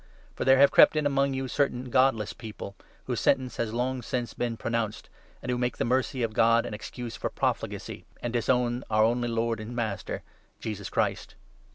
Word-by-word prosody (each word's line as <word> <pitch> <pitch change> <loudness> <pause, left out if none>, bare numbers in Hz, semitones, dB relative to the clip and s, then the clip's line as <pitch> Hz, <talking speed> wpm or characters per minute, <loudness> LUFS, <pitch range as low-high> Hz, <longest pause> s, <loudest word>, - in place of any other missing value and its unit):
For - - -3
there 135 0 +6
have 140 +1 +6
4 - - -26
crept - - +7
in 155 -1 +1
among 140 -1 +2
you 130 0 -2
certain 130 -2 -1
godless 130 -5 +3
people, 110 -3 -8 0.3
whose - - -2
sentence 130 -2 +1
has 115 -2 -1
long 125 +2 -1
since 120 0 -3
been 120 -2 -2
pronounced, 115 -2 -2 0.3
and 125 - -2
who 120 - -1
make 125 -2 -1
the - - 0
mercy 130 +1 0
of 115 -1 -1
God 115 +1 +4
an - - -5
excuse 115 +2 -6
for - - -3
profligacy, - - -3
and 120 -1 -4
disown 120 +1 +1
our 110 0 +4
only 120 +2 +2
lord 115 -1 0
and 110 +3 -7
master, 110 -5 -3 0.4
Jesus 100 -3 -5
Christ. - - -1
120 Hz, 195 wpm, -28 LUFS, 115-130 Hz, 0.4 s, crept